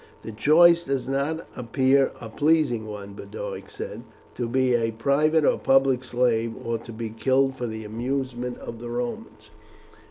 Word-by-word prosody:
"The 110 Hz, -, -6 dB
choice 170 Hz, +9 st, +5 dB
does 135 Hz, -4 st, -2 dB
not 140 Hz, +4 st, -2 dB
appear 130 Hz, +3 st, +2 dB
a 115 Hz, -, -7 dB
pleasing 140 Hz, -3 st, +1 dB
one," 100 Hz, -1 st, -8 dB
Boduoc -, -, -7 dB
said, 475 Hz, +3 st, -7 dB, 0.3 s
"to 120 Hz, -, -3 dB
be 130 Hz, 0 st, +2 dB
a 115 Hz, -1 st, +2 dB
private 145 Hz, +7 st, +2 dB
or -, -, +3 dB
public 135 Hz, -1 st, +3 dB
slave, 120 Hz, -2 st, 0 dB
or 115 Hz, -1 st, -1 dB
to 115 Hz, -, -11 dB
be 115 Hz, 0 st, -5 dB
killed 130 Hz, +3 st, +1 dB
for 125 Hz, -2 st, -4 dB
the 110 Hz, -1 st, -6 dB
amusement 125 Hz, +2 st, -3 dB
of 115 Hz, -, -8 dB
the 120 Hz, 0 st, -7 dB
Romans." 120 Hz, 0 st, -5 dB
125 Hz, 160 wpm, -25 LUFS, 115-140 Hz, 0.3 s, choice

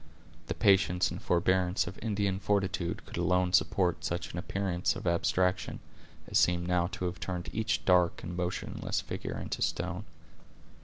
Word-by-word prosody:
The -, -, -2 dB
patience 95 Hz, -2 st, +3 dB
and -, -, -6 dB
forbearance 90 Hz, +1 st, +2 dB
of 90 Hz, -, -8 dB
Indian 100 Hz, -3 st, 0 dB
fortitude 95 Hz, -3 st, -1 dB
could -, -, -8 dB
alone 90 Hz, 0 st, +2 dB
support 90 Hz, -1 st, +2 dB
such 85 Hz, +2 st, -3 dB
an 85 Hz, -, -3 dB
appearance 90 Hz, -1 st, -1 dB
of -, -, -7 dB
abstraction, 90 Hz, +1 st, +1 dB, 0.5 s
as -, -, +3 dB
seemed 85 Hz, 0 st, +2 dB
now 90 Hz, -1 st, +2 dB
to 90 Hz, -, -3 dB
have 90 Hz, +1 st, -3 dB
turned 90 Hz, -2 st, -4 dB
each 110 Hz, 0 st, -1 dB
dark 90 Hz, -2 st, +3 dB
and 90 Hz, +1 st, -5 dB
motionless 90 Hz, 0 st, -2 dB
figure -, -, -5 dB
into -, -, -4 dB
stone. 90 Hz, +3 st, -1 dB
90 Hz, 155 wpm, -30 LUFS, 90-95 Hz, 0.5 s, patience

